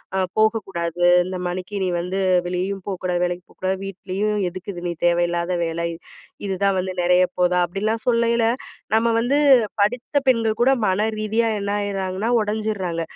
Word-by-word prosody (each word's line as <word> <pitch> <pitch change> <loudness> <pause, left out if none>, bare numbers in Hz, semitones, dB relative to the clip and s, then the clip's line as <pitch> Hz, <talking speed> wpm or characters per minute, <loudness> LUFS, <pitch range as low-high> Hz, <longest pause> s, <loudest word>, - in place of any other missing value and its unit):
"அ - - +1 0.2
போகக்கூடாது, 190 -6 0 0.2
இந்தமாரி 180 +1 -4
நீ - - 0
வந்து 185 +2 -2 0.3
வெளியேயும் 185 +2 -3
போக்கூடாது, 180 -2 -2
வேலைக்கு 175 0 -4
போக்கூடாது, 190 0 -2
வீட்லயும் 195 +2 -2
எதுக்கு 185 +3 -7
இது? 175 0 -7
நீ - - -2
தேவையில்லாத 175 0 +1
வேல. 165 0 -3 0.7
இதுதான் 195 0 +1
வந்து 185 0 -3
நெறையப்போதா?" 180 0 +3
அப்படில்லாம் 215 +5 -2
சொல்லயில, 235 0 +2 0.5
நம்ம 225 +1 +3
வந்து 265 +5 +1 0.4
படித்த 245 +7 0
பெண்கள் 225 -4 +2
கூட 260 - +5 0.2
மன 190 +3 +1
ரீதியா 220 +2 +1
என்னாயிர்றாங்கன்னா? 200 0 -2
ஒடஞ்சிர்றாங்க. 210 -5 -2
190 Hz, 130 wpm, -22 LUFS, 180-215 Hz, 0.7 s, கூட